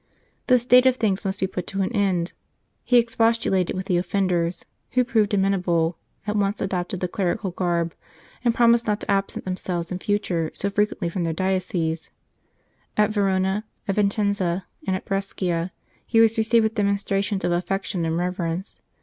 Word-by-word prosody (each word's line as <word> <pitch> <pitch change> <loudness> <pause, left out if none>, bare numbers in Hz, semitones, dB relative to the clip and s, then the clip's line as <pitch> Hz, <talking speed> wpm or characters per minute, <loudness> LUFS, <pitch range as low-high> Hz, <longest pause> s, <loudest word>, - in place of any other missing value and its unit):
This 250 -2 +4
state 250 +1 +6
of 255 - +4
things 210 -5 0
must 195 0 -2
be - - +1
put 185 -2 -4
an 195 +2 0
end 190 -5 +1
to. - - -27 0.5
He 245 - +4
expostulated 230 -6 +2
with 185 0 -3
the 180 -2 +1
offenders, 180 -2 0 0.3
who 250 0 +4
proved 225 -5 +1
amenable, 180 -4 +1 0.3
at 210 0 -2
once 200 0 0
adopted 185 -1 -2
the 180 - 0
clerical 185 +1 -1
garb, 170 -2 -1 0.5
and 235 -2 +2
promised 235 -1 +4
not 210 0 0
to - - -2
absent 195 0 -1
themselves 180 -2 -3
in 180 - -3
future 185 -6 0
so 200 - -2
frequently 205 -3 0
from 170 +1 -2
their 165 -1 -1
dioceses. 180 -3 -1 0.9
At 210 0 +3
Verona, 195 0 +1 0.2
at 195 - +1
Vincenza, 200 -3 0 0.2
and 190 - +1
at 185 - -5
Brescia, 185 -3 -2 0.4
he 225 - +3
was 225 0 +5
received 225 +1 +3
with 220 0 0
demonstrations 200 -1 0
of - - +1
affection 180 0 -1
and 165 0 0
reverence. 180 +1 -3
195 Hz, 165 wpm, -24 LUFS, 180-210 Hz, 0.9 s, state